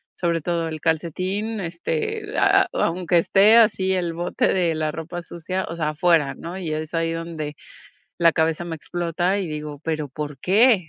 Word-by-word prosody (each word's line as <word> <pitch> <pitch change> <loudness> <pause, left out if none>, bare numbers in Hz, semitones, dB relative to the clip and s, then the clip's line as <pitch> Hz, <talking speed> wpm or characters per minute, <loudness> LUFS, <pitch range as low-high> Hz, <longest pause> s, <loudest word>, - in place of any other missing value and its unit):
sobre 170 -2 0
todo 170 +1 -1
el 155 -1 -5
calcetín, 185 +7 -1
este, 435 - -3
ah - - +5
ah, - - -8 0.2
aunque 175 0 +1
esté 205 +6 +5
así 200 -4 +4
el 175 -3 -1
bote 175 +2 0
de 175 -3 +1
la 155 -1 -1
ropa 165 +2 -6
sucia, 185 +3 -4
o 165 - -5
sea, 155 -2 -1
afuera 155 -2 +2
¿no?, 170 +6 -7
y 170 -5 -3
es 155 +1 -4
ahí 165 0 0
donde 165 -3 -5 0.6
la 170 -1 +5
cabeza 160 +1 0
me 165 -1 -4
explota 175 +4 -1
y 190 -4 -3
digo, 150 -1 -6
¿pero 155 -2 -2
por 145 0 -6
qué? 205 - +4
170 Hz, 180 wpm, -23 LUFS, 160-185 Hz, 0.6 s, ah